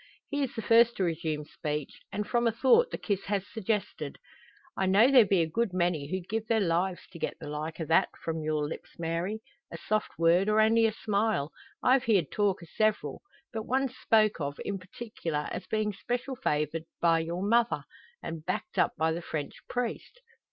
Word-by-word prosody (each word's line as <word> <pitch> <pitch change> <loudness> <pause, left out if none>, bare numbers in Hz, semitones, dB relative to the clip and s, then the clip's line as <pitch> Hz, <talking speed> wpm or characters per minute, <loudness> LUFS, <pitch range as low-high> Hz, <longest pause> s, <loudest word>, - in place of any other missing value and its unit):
He 285 0 -1
is 270 - -2
the 225 - -4
first 235 +1 +5
to 195 - +1
resume 160 -3 -2
speech; 150 -2 -5
and 210 +1 -2
from 240 -1 +2
a - - +3
thought 270 - +4
the - - -4
kiss 200 -3 -2
has 200 -1 -1
suggested: 215 -1 -3 0.6
"I 190 - 0
know 210 +8 +6
there 245 -6 +7
be 185 -3 +3
a - - -2
good 220 +3 -1
many 175 -5 0
who'd 185 0 -3
give 220 +1 -2
their 225 0 +3
lives 180 0 0
to 170 - -10
get - - -3
the 155 - -9
like 150 +3 -5
o' 160 - -2
that 160 - +3
from 165 -1 -2
your 155 -1 0
lips, 160 - -9
Mary. 170 +6 -2 0.3
A - - -6
soft 215 0 -2
word, 170 +4 +4
or 215 +1 +3
only 225 +1 +5
a - - 0
smile. 210 -8 0 0.3
I've 260 0 +4
heerd 195 - +2
talk 200 -4 +1
o' - - -12
several. 215 -1 0 0.3
But 220 -1 -4
one's 260 0 0
spoke 215 -8 +3
of, 140 0 -3
in 200 -1 -2
particular, 180 -6 -4
as 185 - -5
bein' 215 0 0
special 245 +6 -3
favourite 160 - -1
by 165 -1 +4
your 170 +3 -3
mother, 235 +3 +2 0.4
and 165 -2 -5
backed - - -3
up - - +2
by 160 0 +2
the 165 +2 -3
French 155 -3 -4 0.2
priest." 245 - -3
195 Hz, 200 wpm, -29 LUFS, 165-225 Hz, 0.6 s, there